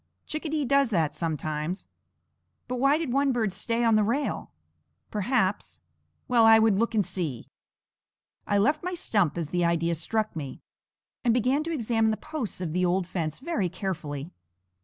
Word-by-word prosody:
Chickadee 310 -1 -2
does 275 -1 +3
that 165 -8 +1
sometimes. 155 +2 -3 0.8
"But 250 0 -3
why 275 +3 +4
did 315 -7 -2
one 275 0 +3
bird 225 -6 0
stay 230 +3 -1
on 230 -1 +4
the 215 -1 +4
rail? 260 +7 -1 0.6
Perhaps" 205 -2 0 0.5
Well, 245 -3 +4
I 225 0 +8
would 220 -3 +4
look 230 0 0
and 205 -3 +3
see. 165 -9 -3 1.0
I 205 - +2
left 295 +11 +2
my 360 0 -2
stump 200 - +1
as 165 -3 -3
the 175 +1 0
idea 170 0 +1
struck 215 +6 -2
me, 140 -5 -6 0.6
and 235 -2 +3
began 255 +5 +2
to 335 - -3
examine 230 -6 +1
the 215 - 0
posts 245 - -5
of 165 -4 -3
the 180 +1 +1
old 180 +1 +2
fence 165 -4 -3
very 275 - -1
carefully. 165 -5 -4
215 Hz, 165 wpm, -27 LUFS, 175-250 Hz, 1.0 s, I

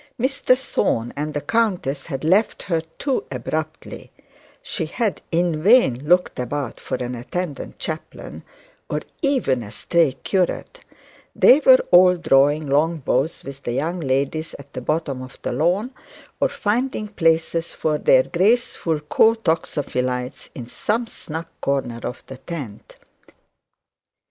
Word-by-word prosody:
Mr 255 0 +2
Thorne 120 - -1
and 150 +1 -4
the 145 - -1
countess 185 -12 0
had 135 -4 -5
left 190 +7 +2
her 170 -5 0 0.2
too 275 -3 -1
abruptly; 155 +5 -5 0.5
she 160 - -3
had 215 +5 -2
in 170 -2 +1
vain 155 - +4
looked 180 -5 +3
about 130 +1 -3
for - - -4
an 125 0 -4
attendant 145 +5 -5
chaplain, 160 -1 -6 0.5
or - - -1 0.2
even 260 - +1
a 105 - -8
stray 150 +7 +1
curate; 190 - -1 0.6
they 270 - +7
were 260 -3 +7
all 180 0 +7
drawing 145 -1 +3
long 150 +4 +2
bows 140 +2 -1
with 140 0 -9
the 120 - -3
young 165 +7 -1
ladies 140 +2 -1
at 140 0 -15
the 125 - -5
bottom 140 -1 -2
of 130 -1 -11
the - - -2
lawn, 180 - +1 0.5
or - - +2
finding 220 +1 -1
places 165 -3 +1
for 155 -1 -1
their 130 -2 +5
graceful 185 -5 +1
co 220 +9 +4
toxophilites 135 - -2
in 125 - -6
some 220 - -1
snug 165 -7 -7 0.2
corner 130 -4 -1
of 125 - -6
the 130 - -10
tent. 135 -7 -8
155 Hz, 140 wpm, -22 LUFS, 135-185 Hz, 0.6 s, they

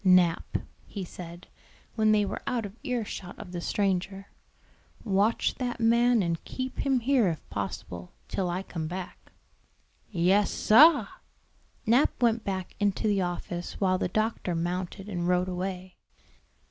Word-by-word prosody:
"Nap," 180 -3 +4 0.3
he 200 - -5
said, 175 0 -10 0.5
when 215 -1 +3
they 210 -1 +4
were - - -4
out 235 -3 0
of 200 +1 -8
ear 250 -6 -2
shot 180 -3 -7
of 180 - -9
the 175 -1 -4
stranger, 195 0 -1 0.7
"watch 205 +1 +2
that 245 -1 -2
man 235 -1 +4
and 170 -1 -2
keep 260 0 -5
him 270 -3 +2
here 250 -3 +3
if 165 -3 -3
possible, 90 -3 -5 0.2
till 185 -2 -1
I 180 +2 -2
come 165 -4 -4
back." 180 +2 -7 0.8
"Yes, 190 +2 +3
sah." 280 0 +6 0.8
Nap 240 +6 +3
went 230 -2 +2
back 190 -2 -4
into 205 +1 +1
the 200 -2 +2
office 175 -1 -4
while 185 -2 +2
the - - 0
doctor 215 -2 -1
mounted 180 +3 -3
and 175 -4 -2
rode 180 0 +2
away. 185 0 -4
195 Hz, 145 wpm, -28 LUFS, 180-225 Hz, 0.8 s, sah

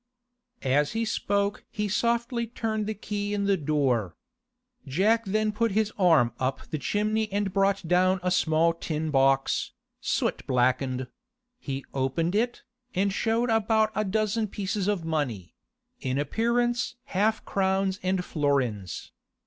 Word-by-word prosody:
As 145 +4 +2
he 225 0 0
spoke 200 -1 -1
he 210 -1 -2
softly 235 +3 0
turned 220 -2 -2
the 220 - -2
key 205 0 -3
in 200 - -1
the 200 0 +3
door. 135 - 0 0.7
Jack 215 - +2
then 215 +2 +1
put 225 0 0
his 215 0 +1
arm 160 - +4
up 130 +1 -2
the 155 - -2
chimney 215 - 0
and 200 -1 -1
brought 195 -2 +1
down 185 +2 +3
a 180 - +1
small 165 -1 +3
tin 160 -1 -3
box, 135 -1 +2 0.3
soot - - -1
blackened; 130 +1 +1 0.5
he 135 - -5
opened 140 +6 0
it, 240 +4 0 0.3
and 195 +1 +1
showed 230 +3 +1
about 220 0 +3
a 215 - 0
dozen 215 +2 0
pieces 200 0 -2
of 200 -5 0
money—in 150 - -4
appearance 235 +9 0
half 220 -3 0
crowns 190 0 0
and 185 0 0
florins. 130 - -1
195 Hz, 135 wpm, -27 LUFS, 150-215 Hz, 0.7 s, arm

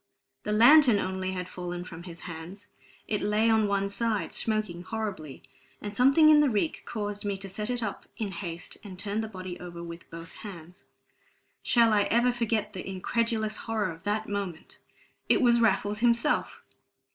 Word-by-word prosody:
The 210 - -3
lantern 240 +2 +7
only 190 -1 -2
had 180 -1 -4
fallen 175 -1 -5
from 170 -2 -9
his 170 0 -10
hands; 180 +5 -9 0.4
it 210 - -1
lay 215 +2 +2
on 220 -1 +3
one 200 0 +1
side, 215 +1 -1
smoking 215 -6 -1
horribly; 190 -10 -5 0.4
and 205 -1 -6
a - - -14
something 275 +6 +6
in 300 - +7
the 295 -2 +4
reek 230 +8 -1
caused 205 -2 -4
me 200 -1 -2
to 195 0 -7
set 210 +4 -4
it 245 -1 -1
up 200 - -5
in 210 -3 -3
haste 175 -3 -6
and 195 -3 -9
turn 205 +3 -2
the 220 - -4
body 185 -3 -7
over 170 -1 -8
with 170 0 -9
both 165 0 -9
hands. 180 -4 -11 0.8
Shall 230 -2 +4
I 205 -1 +4
ever 240 +2 +3
forget 225 -3 -1
the 190 0 -6
incredulous 220 +3 -1
horror 215 -5 -2
of 165 0 -11
that 215 +3 -1
moment? 200 -5 -5 0.5
It - - +5
was 235 -2 +4
Raffles 205 -1 +2
himself! 235 0 +1
205 Hz, 180 wpm, -28 LUFS, 185-225 Hz, 0.8 s, lantern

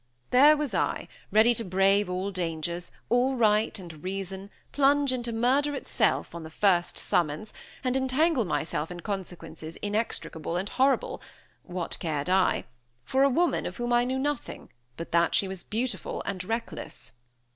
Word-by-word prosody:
There 290 +5 +7
was 290 -7 -2
I, - - 0 0.2
ready 220 +4 +6
to 230 - -3
brave 195 +1 +3
all 185 +2 -2
dangers, 170 -1 -3 0.2
all 250 +3 +3
right 215 -2 +2
and 170 -5 -10
reason, 195 +1 -5 0.2
plunge 285 -1 +3
into 240 -2 -3
murder 265 +6 +2
itself, - - 0
on 170 - -6
the 160 - -8
first 175 +1 +2
summons, 160 +5 -1 0.3
and 255 -1 0
entangle 265 +2 +2
myself 160 -4 -2
in 175 -1 -7
consequences 165 -5 -6
inextricable 205 -6 -2
and 195 +3 -2
horrible 270 +1 +1 0.4
(what 180 -2 -5
cared 155 0 -2
I?) 190 0 +3 0.4
for 265 - +1
a 275 - +6
woman 340 +6 +1
of - - -7
whom 240 -1 -1
I 240 0 +4
knew 260 +2 -1
nothing, 285 0 -3 0.3
but 165 - -7
that 170 0 +3
she 195 - +2
was 190 -1 -6
beautiful 240 +6 -3
and 190 -2 -3
reckless! 225 -5 -5
205 Hz, 155 wpm, -28 LUFS, 175-255 Hz, 0.4 s, There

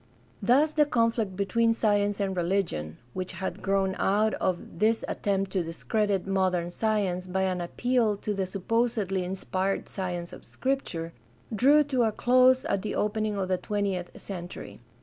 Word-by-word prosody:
— - - -32
Thus 300 +4 +4
the 300 -1 +3
conflict 230 -6 +1
between 230 +4 +2
science 205 -2 +1
and 195 -1 -1
religion, 170 - -1 0.2
which 185 -1 -4
had 190 - -5
grown 195 -1 +1
out 215 +2 +2
of 175 -2 -2
this 220 +2 +2
attempt 195 -1 -1
to 185 -3 0
discredit 195 +4 -1
modern 185 -3 0
science 195 -3 0
by 190 +1 0
an 185 -1 0
appeal 230 +3 +1
to 210 +1 -3
the 195 -2 -2
supposedly 200 -1 0
inspired 190 +1 -2
science 175 -2 -4
of - - -11
Scripture, 190 -12 -3 0.4
drew 285 +7 +5
to 270 -3 0
a 225 -2 +3
close 255 +3 +4
at 200 - 0
the 210 - -3
opening 210 0 0
of 190 -1 -1
the 185 -1 0
twentieth 195 -3 -3
century. 175 -3 -7
195 Hz, 160 wpm, -27 LUFS, 185-225 Hz, 0.4 s, drew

